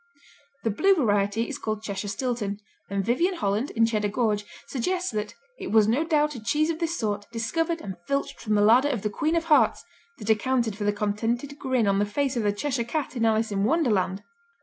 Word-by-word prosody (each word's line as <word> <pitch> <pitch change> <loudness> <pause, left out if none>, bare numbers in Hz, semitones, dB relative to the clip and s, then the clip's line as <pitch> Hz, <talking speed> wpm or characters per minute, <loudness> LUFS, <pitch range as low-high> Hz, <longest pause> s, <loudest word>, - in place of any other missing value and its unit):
The 225 - +1
Blue 390 - +4
variety 210 - +1
is - - -5
called 215 -1 -3
Cheshire 200 -1 -4
Stilton, 215 -2 -2 0.3
and 200 -1 -1
Vyvyan 340 +11 +1
Holland, 210 - -1
in 225 0 +2
Cheddar 215 -2 0
Gorge 210 -1 0 0.2
suggests 360 +8 -2
that 210 -1 -4 0.2
"it - - -5
was 215 -1 +5
no 250 +8 +2
doubt 300 -2 +1
a 240 - -8
cheese 305 +7 +1
of 320 - -5
this 340 0 -1
sort, 205 -2 -2
discovered 325 +9 -1
and 190 -2 -6
filched 275 0 -2
from 215 -2 0
the 205 - +3
larder 245 +7 +5
of 245 -8 -2
the 210 - -1
Queen 315 +8 0
of 335 - +1
Hearts, 305 -4 +3 0.3
that 215 0 0
accounted 235 0 +1
for 205 0 -4
the 205 - +3
contented 225 +7 -2
grin 260 -4 +1
on 200 0 +2
the 205 - +2
face 270 +5 -1
of 235 - 0
the 205 -1 +2
Cheshire 245 +3 -1
Cat 275 +3 -3
in 230 -2 +1
Alice 220 0 +2
in 195 -1 0
Wonderland." 210 - +1
230 Hz, 215 wpm, -26 LUFS, 210-285 Hz, 0.3 s, was